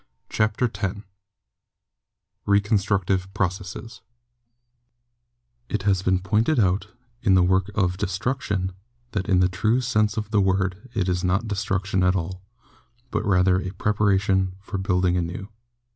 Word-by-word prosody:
CHAPTER 110 +3 +1
X 100 -4 -2 1.5
RECONSTRUCTIVE 100 -2 +1
PROCESSES 100 +3 -3 1.7
It 105 -2 -2
has 95 -2 +2
been 95 0 +2
pointed 110 +10 +1
out, 95 -1 +2 0.3
in 95 -4 +4
the 90 - +5
work 95 +1 +2
of 90 -4 +1
'destruction/ 100 -1 -2 0.4
that 95 -3 -3
in 90 -2 +4
the 90 - +5
true 110 +6 +1
sense 105 -4 +1
of 105 -1 -3
the 105 - +3
word 95 +4 0
it 95 - 0
is 90 0 0
not 95 +5 +1
destruction 95 -1 -1
at 90 +1 +3
all, 90 +1 -3 0.7
but - - -1
rather 95 -2 +3
a 95 - -4
preparation 95 -2 +1
for 100 0 -5
building 90 -2 +1
anew. 90 +3 -4
95 Hz, 130 wpm, -24 LUFS, 95-105 Hz, 1.7 s, the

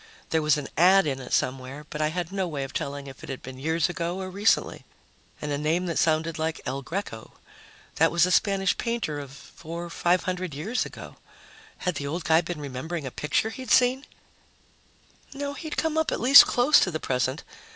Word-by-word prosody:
There 160 - +2
was 150 0 +3
an 145 -2 -5
ad 190 +2 +6
in 135 -3 -2
it 130 - -9
somewhere, 130 +3 -2
but 150 - -4
I 155 - +2
had 175 +2 -3
no 195 -2 -1
way 145 -4 -4
of 135 - -7
telling 140 0 -4
if 135 -2 -11
it - - -10
had 135 - -6
been 130 0 -9
years 160 +3 +1
ago 175 +1 -3
or 185 -1 -5
recently. 205 +4 +1 0.6
And 150 - -4
a 145 - -1
name 160 +4 0
that 170 -2 -1
sounded 160 0 +1
like 160 0 -2
"El 135 +1 -3
Greco." 140 - -6 0.6
That 165 +1 +4
was 170 0 +4
a 180 - -1
Spanish 195 +1 +2
painter 230 -11 -2
of 140 -2 -8
four 165 +5 -9
five 175 +2 +1
hundred 180 -4 -3
years 205 - -2
ago. - - -11 0.6
Had 180 - -2
the 140 - -4
old 165 +4 -3
guy 160 +1 +4
been 175 -1 -6
remembering 145 +3 -5
a 130 - -5
picture 180 - -1
he'd 260 +2 -8
seen? 255 +2 +3 1.3
No, 285 0 -4
he'd 310 +1 -6
come 320 -1 +1
up 320 - 0
at - - -2
least 265 +4 +9
close 250 +5 +5
to - - +2
the 160 -2 -3
present. 130 +2 -1
165 Hz, 205 wpm, -26 LUFS, 145-190 Hz, 1.3 s, least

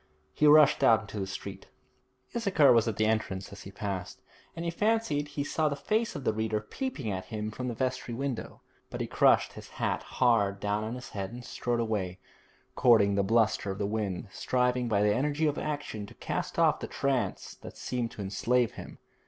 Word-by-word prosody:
He 150 - +3
rushed 150 0 +6
out 110 -1 +6
into 105 0 -7
the 95 - -2
street. 95 - -7 0.7
Issachar 185 - +5
was 115 -1 +3
at 110 - -1
the 110 - +2
entrance 110 -3 -1
as 100 0 -10
he 95 - -9
passed, 100 -3 -5 0.4
and 165 +1 -5
he 170 - 0
fancied 210 -7 +1
he 145 0 -3
saw 155 +1 0
the 145 - -2
face 215 +11 -1
of 145 - -5
the 110 - +1
reader 110 0 -1
peeping 135 - -4
at 95 -1 -4
him 105 +2 -4
from 125 +3 -5
the 120 - -3
vestry 130 -1 -2
window, 135 -2 -4 0.3
but - - -6
he - - -1
crushed - - +3
his - - -11
hat - - 0
hard 105 -6 +2
down 105 +1 -1
on 110 +2 -4
his 125 - -8
head 95 -2 -5
and 120 +1 -9
strode 120 -1 -2
away, 105 -6 -2 0.6
courting 110 -5 +5
the 100 - +2
bluster 110 0 +2
of 95 - -3
the 100 - -1
wind, 105 -2 -2
striving 125 +5 0
by 105 -3 +2
the 105 0 +4
energy 145 +5 0
of 150 -1 0
action 145 -9 -4
to - - -14
cast - - -4
off - - +4
the - - -5
trance 135 -2 -1
that - - -10
seemed 120 -2 -2
to 105 - -7
enslave 115 +5 +1
him. - - -10
115 Hz, 205 wpm, -29 LUFS, 105-140 Hz, 0.7 s, rushed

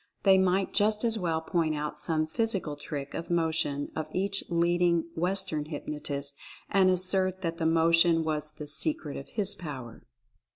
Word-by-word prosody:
They 190 -1 +6
might 190 +1 +1
just 210 +1 +2
as 225 -2 +1
well 165 -3 -1
point 160 -1 0
out 150 0 -3
some 155 0 +1
physical 190 -3 -2
trick 145 -1 -6
of 165 - -5
motion 160 -4 0
of 155 -1 -3
each 195 +1 0
leading 170 0 +2
Western 170 -3 -1
hypnotist 145 -2 -4 0.4
and 190 -1 +4
assert 185 +1 +2
that 165 0 -3
the 160 - +1
motion 165 0 +4
was 155 -1 -1
the 150 0 -8
"secret 150 - +1
of 135 - -8
his 205 -2 +1
power." 130 -9 -8
165 Hz, 160 wpm, -28 LUFS, 150-185 Hz, 0.4 s, They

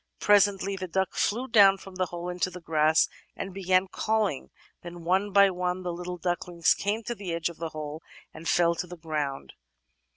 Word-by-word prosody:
"Presently 200 -1 +3
the 185 -1 -5
duck 190 +2 -1
flew 240 +5 0
down 200 -5 +6
from 195 0 -12
the 185 0 -1
hole 175 0 -6
into 180 +1 -1
the 180 0 -9
grass, 160 -1 +3 0.3
and 195 - -6
began 185 0 +2
calling; 215 -6 -1 0.3
then 175 0 -9
one 190 +4 +1
by 200 0 +6
one 180 0 -2
the 175 -1 -3
little 180 +1 -6
ducklings 175 -1 +1
came 210 +3 -2
to 240 - -3
the 200 -6 -6
edge 170 0 -1
of 170 - -11
the 165 0 -4
hole 155 0 -6 0.3
and 160 +1 -6
fell 170 -1 +3
to 175 +2 -5
the 180 0 -9
grotmd. 150 -4 -3
180 Hz, 195 wpm, -27 LUFS, 170-195 Hz, 0.3 s, down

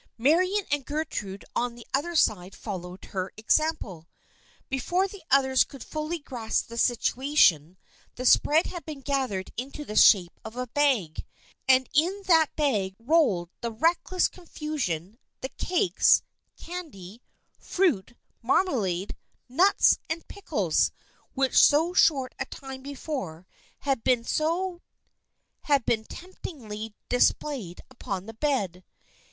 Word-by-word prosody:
Marian 365 - +2
and 290 -1 +1
Gertrude 255 -10 -4
on 245 0 -1
the 240 - -12
other 340 +6 -1
side 195 - +1
followed 185 -3 -7
her 185 -1 -4
example. 215 - 0 0.6
Before 350 +9 0
the 395 0 -11
others 265 -1 +4
could 275 -3 -11
fully 310 +2 -4
grasp 240 -9 -3
the 235 - -8
situation, 240 - +2 0.4
the 255 - -5
spread 305 +5 +5
had 350 -2 -6
been 300 -3 -8
gathered 260 -9 -2
into 275 +4 -6
the 210 - -7
shape 180 -6 +5
of 220 +1 -9
a 250 - -2
bag, 250 - 0 0.4
and 260 0 +5
in 360 +8 +1
that 325 -4 +5
bag 210 -11 0
rolled 230 - +2
in 235 -1 -3
reckless 350 +5 +2
confusion 265 - -5 0.2
the 260 - -4
cakes, 370 +5 +2 0.3
candy, 250 - -9 0.4
fruit, 265 - 0 0.3
marmalade, 210 - 0 0.3
nuts 355 +11 +4
and 325 +1 -4
pickles 405 - 0 0.4
which 270 -1 0
so 320 +5 +5
short 275 -8 +3
a 270 - -1
time 265 -1 -9
before 265 - -6 0.4
had 270 -5 -1
been 250 -2 +2 1.4
temptingly 230 - -3
dis 245 - +5
played 240 - -7
upon 200 -7 -5
the 225 - -9
bed. 215 - -1
265 Hz, 120 wpm, -27 LUFS, 210-310 Hz, 1.4 s, spread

